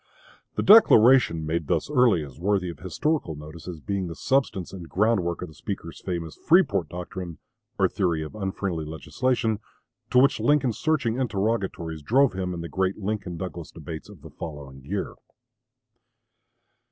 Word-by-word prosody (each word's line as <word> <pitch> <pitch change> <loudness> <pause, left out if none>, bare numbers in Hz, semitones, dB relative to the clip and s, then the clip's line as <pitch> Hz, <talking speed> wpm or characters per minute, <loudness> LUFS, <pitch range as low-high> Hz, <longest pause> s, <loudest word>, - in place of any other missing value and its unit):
The - - 0
declaration 125 - +7
made 80 -1 -2
thus - - 0
early 125 - +3
is 70 0 -11
worthy 95 -1 0
of 80 - -13
historical 95 - -1
notice 75 +2 -10
as 85 -3 -6
being 100 -3 -2
the 85 - -6
substance 130 -10 0
and 90 -4 -8
groundwork 95 -5 +1
of - - -5
the 80 - -14
speaker's 90 -2 -6
famous 85 -4 -4
"Freeport 105 - +3
doctrine," 90 -1 -6 0.4
or - - +4
theory 85 -4 0
of 75 - -8
"unfriendly 95 -5 -3
legislation," 110 +8 -1 0.5
to 125 - +2
which 135 +3 +5
Lincoln's 140 -7 +2
searching 130 -7 +1
interrogatories 100 -8 -1
drove 130 - +3
him 95 -1 -3
in 85 -1 -4
the 85 - -5
great 95 +2 -1
Lincoln 100 -4 -3
Douglas 85 -2 -6
debates 80 +2 -8
of 95 -9 -14
the 80 - -11
following 70 -4 -8
year. - - -3
95 Hz, 155 wpm, -25 LUFS, 80-115 Hz, 0.5 s, declaration